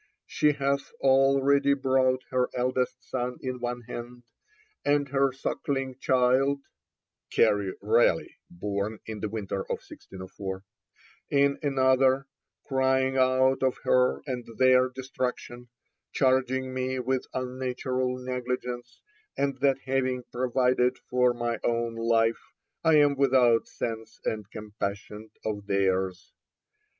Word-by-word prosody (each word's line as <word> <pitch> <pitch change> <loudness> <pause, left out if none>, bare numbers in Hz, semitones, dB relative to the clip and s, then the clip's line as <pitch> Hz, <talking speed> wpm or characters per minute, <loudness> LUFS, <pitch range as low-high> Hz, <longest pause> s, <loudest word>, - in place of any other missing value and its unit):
She 150 0 +2
hath 140 0 -1
already 135 +1 +4
brought 130 -1 +2
her 125 -1 +1
eldest 125 0 -1
son 125 -1 -3
in 130 -1 -4
one 120 0 -3
hand, 120 +1 -8 0.6
and 145 0 +2
her 135 0 +2
sucking 135 0 -3
child 130 +2 +2 0.7
[Carew 100 -2 +2
Raleigh, - - +2
born 100 +4 -3
in 110 -1 -6
the 110 - -3
winter 100 -2 -4
of - - -3
1604] 95 0 -8 0.7
in 140 0 +2
another, 130 -1 +3 0.4
crying 130 -1 +1
out 130 +1 +3
of 130 -1 +1
her 125 0 +2
and 125 -3 -4
their 130 0 +5
destruction; 125 -1 -5 0.4
charging 130 -1 +1
me 130 0 -2
with 130 +1 -1
unnatural 130 0 -2
negligence, 125 -1 -5 0.3
and 140 -1 -1
that 135 -1 +2
having 130 -1 0
provided 125 0 +1
for 125 0 +1
my 120 -1 -2
own 115 0 0
life, 115 0 +1 0.4
I 160 -1 +5
am 145 -1 +5
without 130 -4 +3
sense 110 -1 -5
and 105 -2 -3
compassion 105 0 -6 0.2
of 105 -2 -3
theirs. 95 -2 0
125 Hz, 115 wpm, -27 LUFS, 120-130 Hz, 0.7 s, their